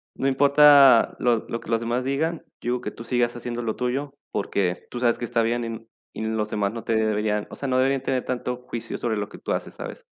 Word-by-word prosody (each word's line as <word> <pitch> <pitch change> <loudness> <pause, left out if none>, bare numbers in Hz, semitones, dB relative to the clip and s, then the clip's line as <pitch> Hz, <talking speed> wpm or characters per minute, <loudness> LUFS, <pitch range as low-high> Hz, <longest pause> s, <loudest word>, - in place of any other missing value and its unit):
no 135 - -1
importa 140 -2 +6
lo 120 -3 +1
lo 115 - -3
que - - -13
los 115 - +2
demás 120 +2 -1
digan, 155 +5 -1 0.2
yo 120 - -1
digo 125 - -2
que - - -4
tú 115 - -10
sigas 120 0 0
haciendo 120 0 -4
lo 110 -2 -2
tuyo 135 +3 -2 0.2
porque 95 -3 -1
tú 120 - -4
sabes 120 -2 +2
que 120 - -4
está 120 0 +1
bien 120 +1 0
y - - -3
n 115 0 -7 0.3
y 110 - -5
los 110 -1 -1
demás 105 -1 -1
no 115 - -6
te 115 - 0
deberían, 105 -1 0
o - - -7
sea, 140 - -5
no 130 -1 +1
deberían 135 +1 +2
tener 130 -1 -1
tanto 125 -1 -3
juicio 115 - -5
sobre 115 -3 -1
lo 105 0 -3
que - - -11
tú - - -5
haces, - - -3
¿sabes? - - -8
120 Hz, 255 wpm, -24 LUFS, 110-130 Hz, 0.3 s, importa